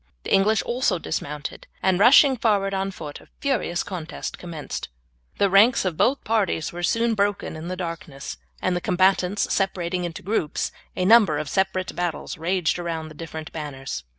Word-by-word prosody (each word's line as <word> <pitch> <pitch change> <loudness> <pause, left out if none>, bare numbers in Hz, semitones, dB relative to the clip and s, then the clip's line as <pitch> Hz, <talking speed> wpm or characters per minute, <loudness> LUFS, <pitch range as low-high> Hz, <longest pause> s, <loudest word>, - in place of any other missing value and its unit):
The - - -2
English 210 +3 +4
also 240 -6 +1
dismounted 150 -3 -5 0.2
and 190 -1 +3
rushing 265 +5 +7
forward 205 -4 +1
on 195 0 -1
foot 155 -6 -8
a - - -18
furious 245 -11 0
contest 175 -5 -6
commenced. 165 - -6 0.5
The 200 - +4
ranks 200 +4 +5
of 180 -3 0
both 265 - +2
parties 200 -8 0
were 175 - -5
soon 230 +6 +2
broken 205 -4 0
in 160 +2 -7
the 185 +1 -4
darkness, 165 -6 -6 0.3
and 185 - +1
the 175 - -1
combatants 185 +2 +2
separating 180 -2 -1
into 170 -2 -5
groups 185 -6 -1 0.2
a 180 - 0
number 205 -7 +6
of 150 0 -3
separate 190 0 0
battles 175 -2 -3
raged 175 0 0
around 165 -2 -4
the - - -11
different 160 0 -7
banners. 135 - -5
185 Hz, 170 wpm, -24 LUFS, 165-200 Hz, 0.5 s, rushing